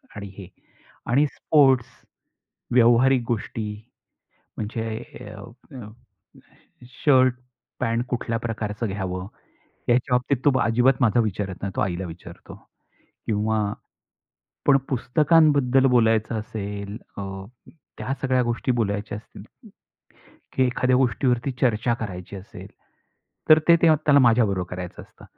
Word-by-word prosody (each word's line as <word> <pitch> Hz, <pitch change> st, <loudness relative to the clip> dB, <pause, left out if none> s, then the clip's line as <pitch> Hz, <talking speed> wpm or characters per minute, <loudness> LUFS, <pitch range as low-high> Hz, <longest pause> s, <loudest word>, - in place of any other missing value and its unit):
आणि 100 Hz, 0 st, -7 dB
हे. 95 Hz, -, -9 dB, 0.6 s
आणि 140 Hz, +5 st, +3 dB
स्पोर्ट्स, 135 Hz, -4 st, +3 dB, 0.9 s
व्यावहारिक 125 Hz, +2 st, +5 dB
गोष्टी 110 Hz, -1 st, -3 dB, 0.9 s
म्हणजे 110 Hz, +1 st, -4 dB, 0.2 s
अ -, -, -10 dB, 0.4 s
अ 115 Hz, -5 st, -8 dB, 1.2 s
शर्ट, 130 Hz, -3 st, +5 dB, 0.5 s
पॅन्ट 120 Hz, 0 st, -1 dB
कुठल्या 115 Hz, -2 st, -2 dB
प्रकारचं 110 Hz, -1 st, -4 dB
घ्यावं, 95 Hz, -2 st, -4 dB, 0.6 s
याच्या 125 Hz, +1 st, +2 dB
बाबतीत 125 Hz, +3 st, +1 dB
तो 140 Hz, -3 st, +4 dB
अजिबात 120 Hz, +4 st, +3 dB
माझं 120 Hz, -1 st, +3 dB
विचारत 100 Hz, -3 st, -3 dB
नाही, 100 Hz, -, -3 dB
तो -, -, 0 dB
आईला 95 Hz, -1 st, -2 dB
विचारतो. 85 Hz, +1 st, -11 dB, 0.7 s
किंवा 105 Hz, -1 st, 0 dB, 0.9 s
पण 140 Hz, -1 st, +6 dB
पुस्तकांबद्दल 140 Hz, 0 st, +3 dB
बोलायचं 115 Hz, -2 st, +2 dB
असेल, 100 Hz, -1 st, -6 dB, 0.2 s
अ, -, -, -4 dB, 0.8 s
त्या 135 Hz, -, -3 dB
सगळ्या 130 Hz, -2 st, +2 dB
गोष्टी 120 Hz, +2 st, -1 dB
बोलायच्या 105 Hz, -3 st, -2 dB
असतील. 105 Hz, -, -13 dB, 1.1 s
की 130 Hz, -, +2 dB
एखाद्या 125 Hz, +1 st, +1 dB
गोष्टीवरती 125 Hz, 0 st, +1 dB
चर्चा 120 Hz, -1 st, +2 dB
करायची 100 Hz, -4 st, -6 dB
असेल, 95 Hz, +1 st, -10 dB, 0.8 s
तर 155 Hz, -, +8 dB
ते, 170 Hz, -, +8 dB
ते 165 Hz, -1 st, +4 dB
त्याला 145 Hz, -1 st, +6 dB
माझ्याबरोबर 110 Hz, -7 st, +2 dB
करायचं 90 Hz, -1 st, -7 dB
असतं. -, -, -18 dB
115 Hz, 115 wpm, -23 LUFS, 105-130 Hz, 1.2 s, तर